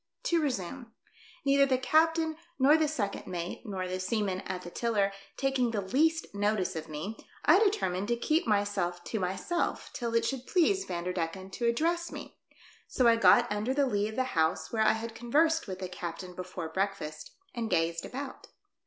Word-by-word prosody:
To 340 -9 +2
resume. 240 - -3 0.5
Neither 275 0 +5
the 260 -1 +2
captain, 320 +4 +2 0.2
nor 280 +3 +6
the 315 -1 +3
second 220 -10 -3
mate, 175 -1 -4
nor 190 -3 -3
the 185 0 -3
seaman 195 -1 -1
at 185 -1 -4
the 175 - -8
tiller, 210 -3 +1 0.3
taking 270 -3 +1
the 220 -3 -1
least 315 +11 +2
notice 200 -2 0
of 160 0 -5
me, 155 +9 -5 0.3
I 350 +6 +7
determined 385 - +1
to 240 - +2
keep 310 +5 +1
myself 200 -4 0
to 220 - -3
myself 190 - -2
till 235 -2 -3
it 230 0 +3
should 260 0 -3
please 380 +2 +2
Vanderdecken 180 +1 -3
to 235 +4 -1
address 335 +8 +1
me; - - -9 0.5
so 255 - +1
I 230 -1 +7
got 235 +1 +6
under 215 +5 -1
the 285 -1 +3
lee 205 -5 0
of 220 - -6
the 260 - +2
house 160 -1 +1
where 220 - +1
I 220 - +5
had 225 +1 -5
conversed 310 +8 +2
with 190 -1 -5
the 185 -1 -4
captain 180 0 -6
before 180 -2 -6
breakfast, 160 -4 -3 0.2
and 230 -2 -3
gazed 165 -1 +1
about. 270 +1 -7
220 Hz, 180 wpm, -30 LUFS, 185-270 Hz, 0.5 s, I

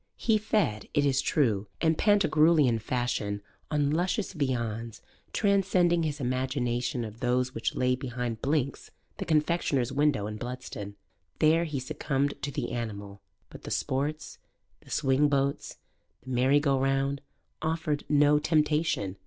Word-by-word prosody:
He 220 -2 +2
fed, 205 - 0
it 145 - +3
is 135 -1 +2
true, 110 -9 +1
in 160 -1 +3
Pantagruelian 160 - +4
fashion 110 -4 -2 0.3
on 145 -2 +1
luscious 180 +5 -1
viands, 115 - -2 0.3
transcending 190 -4 +2
his 150 -2 -2
imagination 125 -1 -1
of 110 +1 -9
those 125 +1 0
which 115 - -2
lay 125 0 +2
behind 125 -3 -4
Blinks 140 -1 -1 0.3
the - - -4
confectioner's 150 -5 +1
window 140 -5 +1
in 105 0 -5
Bludston: 120 -4 -6 0.4
there 160 +2 +4
he 150 -4 -3
succumbed 140 +1 -1
to 145 - -2
the 140 - -4
animal; 100 -4 -5 0.3
but - - -11
the - - -8
sports, 145 +4 -2 0.4
the - - -19
swing 135 +2 +2
boats, 140 0 -1 0.5
the 130 - -8
merry 130 +3 +4
go 140 -2 +1
round, 135 +1 0 0.4
offered 160 -2 -1
no 145 0 +5
temptation. 150 - +1
135 Hz, 135 wpm, -28 LUFS, 125-155 Hz, 0.5 s, no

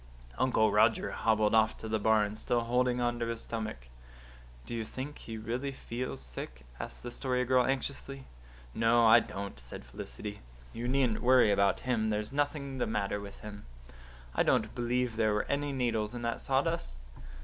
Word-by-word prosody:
Uncle 110 -4 +3
Roger 110 +2 +3
hobbled 110 -1 +2
off 110 0 +4
to 110 - -7
the 110 0 0
barn, 105 -1 +3
still 120 +2 0
holding 125 +1 +1
on 120 0 0
to 115 - -1
his 115 -1 -3
stomach. 110 - -5 0.8
"Do - - -7
you 115 -1 -2
think 130 +6 -7
he 115 -1 -7
really 120 +5 -3
feels 125 -1 -5
sick?" - - -7
asked - - -6
the 120 - -5
Story 125 0 -1
Girl 130 0 +4
anxiously. 135 0 -3 0.5
"No, 115 +1 +4
I 110 - +9
don't," 100 -8 -6
said - - -10
Felicity. 65 - -7 0.3
"You 120 +1 -4
needn't 130 -4 +2
worry 125 -3 +6
over 100 0 +4
him. 115 -4 0
There's 105 +1 -1
nothing 140 -1 -1
the - - +1
matter 105 -2 -1
with 100 -1 -10
him. 105 -1 -9 0.7
I - - +2
don't - - +2
believe 120 -1 -1
there 110 -2 +2
were 105 - 0
any 145 0 0
needles 115 -4 -1
in 120 - -5
that 115 0 -2
sawdust. 135 - 0
115 Hz, 175 wpm, -31 LUFS, 105-125 Hz, 0.8 s, I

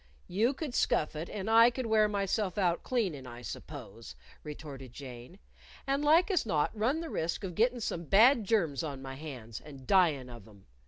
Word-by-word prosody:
"You 225 +9 +1
could 290 -3 -5
scuff 155 -8 +1
it 160 +3 -5
and 205 -1 -5
I 230 +1 +7
could 250 +1 -4
wear 220 -1 +4
myself 200 -1 -1
out 175 -4 +1
cleanin', 185 - -2
I 120 0 -10
suppose," - - -9 0.3
retorted 140 -4 -9
Jane. 125 +4 -10 0.5
"And 275 +2 0
like 330 +6 +4
as 365 - +2
not 160 -2 0
run 250 +9 0
the 330 - -6
risk 165 +5 -2
of 185 -2 -4
gittin' 240 +6 +1
some 170 -5 -3
bad 225 - +5
germs 180 -9 +1
on 140 -4 -5
my 135 0 -6
hands, 130 -6 -8
and 140 -3 -12
dyin' 160 -9 +3
of 120 -4 -11
'em. 100 -3 -18
180 Hz, 190 wpm, -31 LUFS, 140-225 Hz, 0.5 s, I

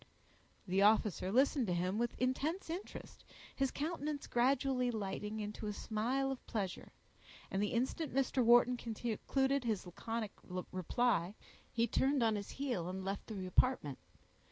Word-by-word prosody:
The 190 0 +1
officer 205 -3 +3
listened 265 +1 +3
to 180 - +1
him 185 +4 0
with 240 0 -1
intense 300 +8 -1
interest, 360 +4 -7 0.3
his 270 -1 +1
countenance 300 -1 -3
gradually 255 0 +2
lighting 210 -1 -3
into 210 +1 -4
a 210 - -2
smile 245 +7 -1
of 265 - -5
pleasure, 195 -5 -3 0.6
and 195 - 0
the 210 - +2
instant 265 +6 -1
Mr. 265 -1 +2
Wharton 240 +1 +6
concluded 245 +4 0
his 220 -6 -1
laconic 220 +4 -4 0.4
reply 190 0 +1 0.4
he 230 0 +2
turned 270 +1 +2
on 220 -1 +3
his 200 -1 -4
heel 245 -11 -2
and 190 +1 -5
left 195 +1 -3
the 200 -4 -5
apartment. 185 - +2
235 Hz, 145 wpm, -36 LUFS, 205-265 Hz, 0.6 s, Wharton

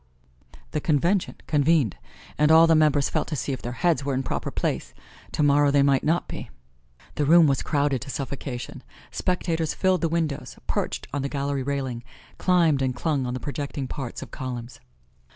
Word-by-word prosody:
The 150 - -2
Convention 170 +6 +1
convened 145 - +2 0.4
and 150 +2 +3
all 160 +1 +8
the 165 - +4
members 150 -3 +4
felt - - -1
to 155 - -3
see 140 - -2
if 130 - -4
their 120 - -5
heads 160 -6 +3
were 140 -1 -1
in 130 - -1
proper - - -3
place - - -3 0.4
tomorrow 145 -1 +3
they 140 0 +4
might 140 -2 +3
not 165 +3 +1
be. - - -7 0.7
The 150 - +1
room 165 +3 +7
was 140 -3 +2
crowded 145 -3 0
to 135 - -7
suffocation. 135 -2 -5 0.3
Spectators 165 -3 -1
filled 185 -1 +2
the 165 - +1
windows, 160 -4 -2
perched - - -2
on 145 - -1
the 140 - -2
gallery 140 -1 -2
railing, 130 -3 -3 0.4
climbed 170 -6 +3
and 130 -1 0
clung 140 -3 -1
on 125 - -3
the - - -3
projecting 140 -1 -4
parts 135 -2 -5
of - - -13
columns. 125 -3 -6
145 Hz, 180 wpm, -25 LUFS, 135-160 Hz, 0.7 s, all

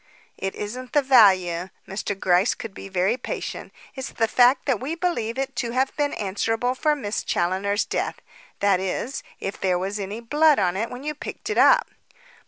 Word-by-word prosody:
"It 190 0 -4
isn't 245 +5 -6
the 290 - +4
value." 190 -9 +4 0.2
Mr. 195 0 -4
Gryce 185 +4 +3
could 225 -4 -8
be 195 - -9
very 190 +5 +1
patient. 250 - -5 0.2
"It's 265 -2 -5
the 225 - 0
fact 250 +3 +4
that 265 -7 +1
we 290 +6 -3
believe 330 -10 -2
it 270 0 -3
to 235 -2 -2
have 260 +1 0
been 290 -1 0
answerable 225 +5 -1
for 300 +3 +1
Miss 215 -6 -3
Challoner's 190 +4 0
death - - -2 0.4
that 200 -2 +3
is, 190 +8 -3 0.2
if 195 - -5
there 185 -2 +2
was 195 +3 -3
any 200 +3 -4
blood 295 +6 +3
on 180 -3 +1
it 225 +4 -2
when 250 +2 -8
you 300 +1 -2
picked 300 +7 -6
it - - -2
up." - - +6
225 Hz, 190 wpm, -24 LUFS, 195-265 Hz, 0.4 s, up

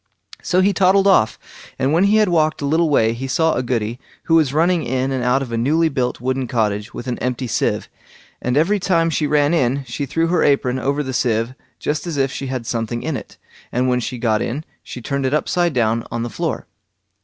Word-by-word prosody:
So 180 +1 +2
he 200 +2 +3
toddled 195 +1 +4
off, 185 - +4 0.4
and 135 +2 +1
when 175 +4 +4
he 205 +2 +3
had 215 -1 +4
walked 155 -4 +1
a - - 0
little 160 +3 +2
way 115 -6 +3
he 130 +3 -5
saw 160 +4 +2
a - - 0
Goody, 120 -1 -2 0.2
who 165 - 0
was 155 -5 +4
running 165 +3 +2
in 130 +1 -1
and 130 -2 -1
out 125 +2 +2
of 125 - -8
a 115 - -1
newly 160 +7 +2
built 130 -4 -2
wooden 130 +1 -1
cottage 110 -1 -1
with - - -7
an 125 -2 -3
empty 125 0 -2
sieve, 120 - -1 0.5
and 125 +2 0
every 195 +7 +3
time 170 -3 +1
she 150 -1 0
ran 145 +1 +2
in, 135 -3 +1
she 140 +2 -4
threw 165 +5 0
her 170 0 +1
apron 130 -3 +2
over 140 +3 -1
the 130 -1 -5
sieve 115 -1 0 0.2
just 150 +3 -3
as 165 -4 -3
if 135 -1 +1
she 135 - -5
had 130 -3 -4
something 115 0 -3
in 160 - -2
it, - - -8 0.3
and 125 +2 +1
when 125 0 +2
she 125 +1 -4
got 110 -3 +1
in 140 +6 -3 0.2
she 125 - -9
turned 140 +1 -2
it 135 - +1
upside 175 +3 +1
down 115 -2 +1
on 115 0 -3
the 120 - -5
floor. - - -3
135 Hz, 230 wpm, -20 LUFS, 125-160 Hz, 0.5 s, toddled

